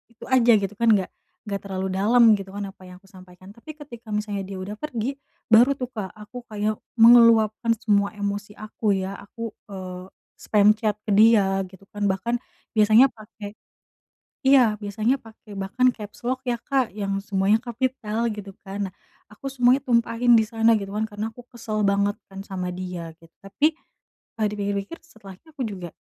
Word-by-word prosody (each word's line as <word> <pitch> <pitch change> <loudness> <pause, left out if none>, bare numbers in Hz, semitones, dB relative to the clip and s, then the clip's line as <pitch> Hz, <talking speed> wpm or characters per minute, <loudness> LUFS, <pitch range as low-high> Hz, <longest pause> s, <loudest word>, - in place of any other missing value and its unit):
itu - - -14
aja 245 -2 +5
gitu 200 -1 0
kan, 235 - +2
nggak 190 -2 -2 0.3
nggak 205 -3 -4
terlalu 190 -1 -3
dalam 220 +3 +5
gitu 195 0 -9
kan, 200 -1 -5
apa 190 - -18
yang 180 0 -13
kusampaikan, 185 -1 -16
tapi 235 +9 -11
ketika 235 -7 -10
misalnya 205 -2 -2
dia 190 -1 -7
udah 205 +3 -6
pergi, 265 0 -4 0.3
baru 240 +5 +6
tuh 255 -2 -5
Kak 210 -6 -6
aku 225 +4 -11
kayak 215 -1 -2 0.2
meluapkan 230 -1 +6
semua 200 -2 +1
emosi 205 0 -4
aku 215 -1 -1
ya, 190 +1 -4
aku, 230 +3 -7 0.2
eee, 185 -1 -7 0.3
spam 210 -1 +3
chat 215 -2 0
ke - - -7
dia 200 -3 +5
gitu 190 0 -17
kan, 205 0 -2
bahkan 215 +6 -1 0.4
biasanya 215 +4 +7
pake 210 -2 -11 0.9
iya, 255 -5 +6
biasanya 220 +5 -1
pake 220 -2 -15
bahkan 245 +7 +2
capslock 240 +4 -5
ya 240 - +1
Kak, 265 -8 0
yang 195 -1 -2
semuanya 200 +1 +1
kapital 240 -2 -2
gitu 200 -2 -9
kan. 195 +1 -4
Nah - - -26 0.4
aku 270 +6 -7
semuanya 255 +1 +3
tumpahin 235 -1 +2
di 220 - 0
sana 225 0 +3
gitu 200 +1 -7
kan, 220 - 0
karena 210 0 -5
aku 245 +2 -14
kesel 215 -3 -3
banget 200 +1 +1 0.2
kan 195 - -9
sama 185 -2 -4
dia 180 -2 -6
git 165 - -18
tapi, 295 +11 +1 0.6
eee, 215 - +2
dipikir-pikir 200 +6 -3
setelahnya 220 - -15
aku 290 - -8
juga, 180 -5 -7
210 Hz, 170 wpm, -24 LUFS, 195-235 Hz, 0.9 s, biasanya